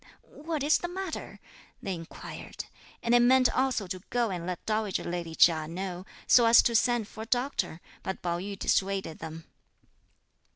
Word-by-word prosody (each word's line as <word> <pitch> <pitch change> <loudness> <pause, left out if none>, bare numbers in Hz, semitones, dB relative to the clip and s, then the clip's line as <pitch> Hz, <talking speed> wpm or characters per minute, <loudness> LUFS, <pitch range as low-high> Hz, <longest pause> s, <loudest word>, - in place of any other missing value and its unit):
"What 310 -1 -5
is 300 +2 +4
the 350 - -3
matter?" 370 -1 -6 0.4
they 195 - -3
inquired, 165 -2 -8 0.4
and 235 - +2
they 240 - +7
meant 255 +1 +5
also 260 -5 +1
to 185 0 -6
go 240 -3 +1
and 175 -2 -4
let 180 -2 -5
dowager 215 -3 -1
lady 170 -2 -4
Chia 160 -2 +5
know, 180 +2 -5 0.2
so 240 -2 +6
as 230 0 +8
to 235 - +1
send 235 -1 +2
for 220 - -10
a - - -5
doctor, 245 - -1 0.2
but 190 - -5
Pao 170 -1 -1
yü 200 +2 -5
dissuaded 195 -5 0
them. 160 0 -8
200 Hz, 170 wpm, -29 LUFS, 175-245 Hz, 0.4 s, as